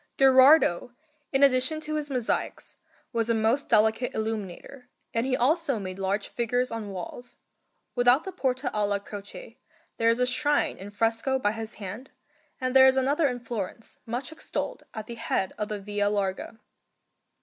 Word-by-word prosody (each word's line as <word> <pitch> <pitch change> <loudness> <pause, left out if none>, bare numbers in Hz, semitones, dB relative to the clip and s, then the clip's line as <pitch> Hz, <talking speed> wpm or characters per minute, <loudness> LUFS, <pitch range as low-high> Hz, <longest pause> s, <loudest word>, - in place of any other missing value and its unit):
Gherardo, 260 - +5 0.4
in 270 0 +3
addition 265 +3 +3
to 310 0 -4
his 300 -1 -2
mosaics, 250 -4 -2 0.4
was 230 -1 0
a 230 - +3
most 225 +6 +1
delicate 220 +2 +3
illuminator, 220 +4 -5 0.2
and 230 +2 0
he 255 - +1
also 290 0 +1
made 190 -2 -6
large 195 +1 -1
figures 245 +1 -1
on 225 -2 -5
walls. 195 +6 -8 0.6
Without 245 +3 +4
the 380 - -6
Porta 260 -5 -2
alla 205 -1 +1
Croce 205 - -10 0.4
there 230 0 +3
is 230 +1 +2
a 250 - +3
shrine 295 +3 +1
in 195 +2 -8
fresco 225 +5 0
by 205 -5 +1
his 225 +1 -6
hand, 215 +6 -8 0.5
and 255 0 -2
there 265 0 +9
is 265 0 +4
another 285 +4 +2
in 250 -2 -3
Florence, 225 -1 -6
much 245 +7 -4
extolled, 315 - -4
at 220 -1 -5
the 235 - -7
head 225 -4 -2
of 210 - -1
the 210 - -3
Via 205 0 -1
Larga. 200 +2 -2
235 Hz, 165 wpm, -27 LUFS, 210-265 Hz, 0.6 s, there